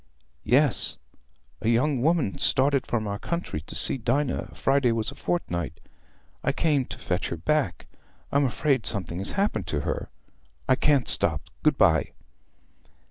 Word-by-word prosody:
"Yes; 135 -1 +4 0.6
a 110 - +1
young 125 +3 +2
woman 155 - +1
started 140 0 +2
from 115 -2 -1
our 100 0 -3
country 170 - -3
to 80 - -7
see 135 - +3
Dinah, 135 +4 -1
Friday 135 -3 +2
was 115 +2 -1
a - - -12
fortnight. 85 - -3 0.6
I - - +2
came 145 -5 +1
to - - -8
fetch 90 0 -2
her 85 - -4
back. 100 - -1 0.5
I'm 140 0 +3
afraid 135 -1 0
something 90 -4 -2
has 95 - -3
happened 200 +2 -1
to 75 - -1
her. - - -3 0.6
I - - +5
can't 140 -2 +2
stop. 75 -1 +1 0.2
Good 155 -2 +3
bye." 80 -4 +3
130 Hz, 150 wpm, -26 LUFS, 100-145 Hz, 0.6 s, I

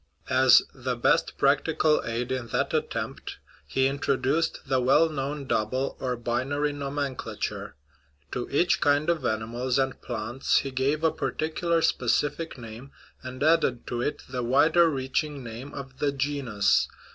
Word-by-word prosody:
As - - +6
the - - -3
best - - +1
practical 155 -1 +2
aid 120 +2 -3
in 125 -2 -2
that - - -1
at - - 0
tempt - - -5 0.3
he 130 - +1
introduced 140 +2 0
the 130 -2 +1
well 135 +6 +4
known 140 -1 -4
double 130 +2 -1
or 125 -2 -2
binary 135 +5 -1
nomenclature; 140 -1 -4 0.6
to 125 - -4
each 175 +6 +2
kind 145 +3 +3
of 160 -5 -2
animals 120 +3 -1
and 135 -1 -1
plants 120 +2 0
he 135 - -3
gave 135 +4 0
a 160 - +4
particular 165 +1 -1
specific 145 +6 0
name, 115 +2 -10 0.3
and 130 +1 -6
added 155 -6 +2
to 120 0 -3
it 145 - -2
the 125 -1 -3
wider 160 +8 +4
reaching 140 0 -2
name 120 +4 -8
of 135 -2 -9
the 145 - +1
genus. 135 -7 +1
135 Hz, 145 wpm, -26 LUFS, 125-145 Hz, 0.6 s, As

